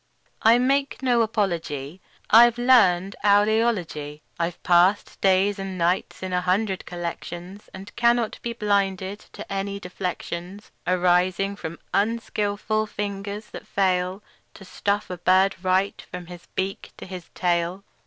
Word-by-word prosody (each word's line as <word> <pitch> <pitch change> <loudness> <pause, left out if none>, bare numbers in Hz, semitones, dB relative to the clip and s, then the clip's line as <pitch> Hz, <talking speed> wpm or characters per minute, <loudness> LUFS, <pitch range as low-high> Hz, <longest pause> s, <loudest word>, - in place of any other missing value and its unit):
I 230 +2 +6
make 275 +2 0
no 245 -2 +3
apology; 170 - -2 0.3
I've 235 +1 +7
learned 200 -7 +4
owl 205 0 +5
eology. 180 -10 -1 0.2
I've 170 0 -1
passed 180 +3 +3
days 195 +1 +3
and 195 -1 -5
nights 175 +2 0
in 185 -1 -4
a 180 - +1
hundred 190 +1 0
collections, 175 +2 -7
And 195 +2 -11
cannot 235 -1 +2
be 235 - -3
blinded 200 -2 0
to - - -7
any 200 0 -3
deflections 180 +1 -6 0.2
Arising 185 +2 +2
from 165 -4 -7 0.2
unskilful 215 0 0
fingers 205 0 -5
that 215 - -9
fail 185 0 0 0.3
To 195 - -12
stuff 200 +2 -2
a 180 - -5
bird 185 +2 +3
right, 185 +2 +1
from 180 -1 -6
his 175 0 -12
beak 195 +1 -3
to - - -9
his 180 -3 -9
tail. 175 +1 0
195 Hz, 135 wpm, -24 LUFS, 180-210 Hz, 0.3 s, I've